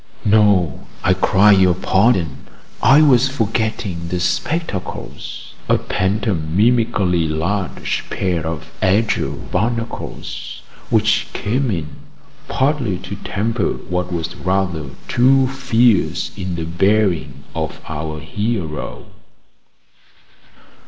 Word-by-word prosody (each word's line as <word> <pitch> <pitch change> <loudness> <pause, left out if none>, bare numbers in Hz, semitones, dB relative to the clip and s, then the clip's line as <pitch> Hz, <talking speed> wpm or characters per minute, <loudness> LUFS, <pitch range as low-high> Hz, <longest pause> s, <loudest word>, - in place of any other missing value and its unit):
No, 100 -7 +3 0.2
I 95 - +4
cry 95 +2 +4
your 95 -3 +5
pardon, 90 - +1 0.3
I 135 +6 +6
was 135 -3 +5
forgetting 110 -7 -2
the 90 +1 -2
spectacles 95 - -3 0.2
a - - +5
pantomimically 100 0 +1
large 90 +5 -2
pair 90 -4 -1
of 80 0 -5
azure 100 +4 +2
barnacles, 115 +4 -4 0.3
which - - +2
came 125 +5 -1
in 75 -7 -4 0.5
partly 135 -8 0
to - - -7
temper 110 -1 -1
what 90 0 -4
was 85 0 -3
rather 90 -6 -1 0.2
too 130 +2 +4
fierce 125 -5 +1
in 95 -2 -4
the 85 -1 -3
bearing 85 -6 +1
of - - -4
our 75 0 -4
hero. 90 -2 -3
95 Hz, 100 wpm, -19 LUFS, 85-115 Hz, 0.5 s, I